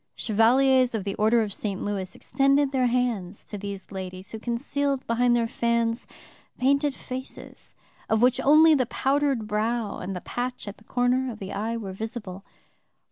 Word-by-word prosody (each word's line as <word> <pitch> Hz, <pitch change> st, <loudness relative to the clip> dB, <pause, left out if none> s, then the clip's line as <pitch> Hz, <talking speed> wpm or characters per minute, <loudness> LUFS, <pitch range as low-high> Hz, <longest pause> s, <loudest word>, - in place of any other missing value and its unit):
Chevaliers 250 Hz, +3 st, +3 dB
of 210 Hz, -, -2 dB
the 200 Hz, 0 st, -3 dB
Order 220 Hz, +3 st, +3 dB
of 205 Hz, -2 st, -5 dB
St. 200 Hz, -2 st, -3 dB
Louis 195 Hz, -3 st, -3 dB
extended 275 Hz, 0 st, +2 dB
their 260 Hz, -2 st, +2 dB
hands 235 Hz, -6 st, -1 dB
to -, -, -4 dB
these 200 Hz, -1 st, -7 dB
ladies, 185 Hz, 0 st, -7 dB
who 220 Hz, -, -6 dB
concealed 275 Hz, +4 st, -2 dB
behind 240 Hz, +1 st, +2 dB
their 235 Hz, -1 st, +2 dB
fans 235 Hz, 0 st, 0 dB, 0.5 s
painted 280 Hz, +2 st, +2 dB
faces, 260 Hz, +1 st, -9 dB, 0.3 s
of 220 Hz, -, +3 dB
which 250 Hz, 0 st, +4 dB
only 310 Hz, +3 st, +6 dB
the 260 Hz, -5 st, +2 dB
powdered 275 Hz, -3 st, 0 dB
brow 215 Hz, +1 st, -1 dB
and 195 Hz, -, -5 dB
the 180 Hz, -, -5 dB
patch 245 Hz, +2 st, -4 dB
at 205 Hz, -, -7 dB
the -, -, -20 dB
corner 250 Hz, +1 st, +1 dB
of 220 Hz, -, -9 dB
the 195 Hz, -2 st, -7 dB
eye 225 Hz, +3 st, -2 dB
were 200 Hz, -4 st, -6 dB
visible! 200 Hz, -2 st, -6 dB
235 Hz, 170 wpm, -26 LUFS, 205-255 Hz, 0.5 s, only